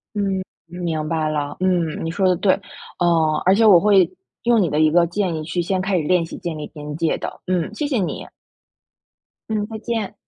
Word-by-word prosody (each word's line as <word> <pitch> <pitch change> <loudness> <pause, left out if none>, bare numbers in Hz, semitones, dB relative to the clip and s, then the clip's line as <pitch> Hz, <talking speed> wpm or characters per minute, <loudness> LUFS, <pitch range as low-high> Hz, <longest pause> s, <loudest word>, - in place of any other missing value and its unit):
嗯， 195 -2 0 0.2
明 165 -3 -3
白 160 -1 0
了。 145 -1 -3
嗯， 175 -5 0
你 165 - -2
说 190 +3 0
的 180 - +3
对。 190 +2 +3 0.5
嗯， 165 -3 +2
而 185 - +5
且 225 +3 +3
我 200 -5 +8
会， 195 -2 +4 0.4
用 235 -1 +4
你 180 - +2
的 150 0 0
一 155 0 +5
个 170 +2 +4
建 180 0 -1
议 155 - -3
去 170 +3 -2
先 185 +2 -1
开 190 0 0
始 - - -1
练 180 +1 +2
习 165 - -8
建 170 -2 -4
立 150 - -5
边 150 -1 -7
界 165 -1 0
的， - - -7
嗯， 180 0 -1
谢 295 - -2
谢 275 -4 0
你。 185 - -3 1.2
嗯， 210 -1 -1
再 220 0 -7
见。 225 -3 -3
175 Hz, 230 characters per minute, -21 LUFS, 160-200 Hz, 1.2 s, 我